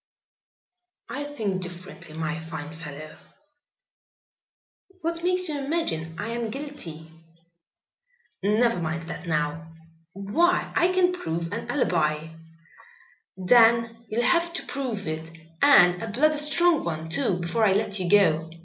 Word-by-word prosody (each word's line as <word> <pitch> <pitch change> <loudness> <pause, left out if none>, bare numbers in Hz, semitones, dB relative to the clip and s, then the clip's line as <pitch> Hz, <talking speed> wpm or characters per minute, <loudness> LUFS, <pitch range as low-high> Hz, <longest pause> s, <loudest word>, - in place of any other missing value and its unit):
"I 285 +2 -4
think 215 -10 -3
differently, 175 -3 -9
my 160 0 -2
fine 160 -2 -7
fellow." 155 -1 -9 1.8
"What 335 +1 -3
makes 365 0 +2
you 300 -2 -2
imagine 165 - -2
I 205 +5 -4
am 235 -1 -3
guilty?" 215 - -8 1.3
"Never 215 +1 +2
mind 165 0 -3
that 175 - -7
now." 155 +1 -2 0.4
"Why, 320 - +1
I 355 +1 +3
can 365 -1 +3
prove 165 - -4
an 230 - -5
alibi." 160 - 0 1.1
"Then 230 +3 +4
you'll 230 +3 0
have 340 +6 +2
to - - -5
prove 250 -8 -4
it, 160 +1 -4 0.3
and 180 -11 +6
a 225 - -4
bloody 295 +9 +2
strong 315 +2 +3
one 160 -1 -4
too, 195 +2 0
before 175 +6 -1
I 200 -3 +5
let 205 0 0
you 180 -2 -2
go. 165 -6 +4
200 Hz, 130 wpm, -25 LUFS, -, 1.8 s, and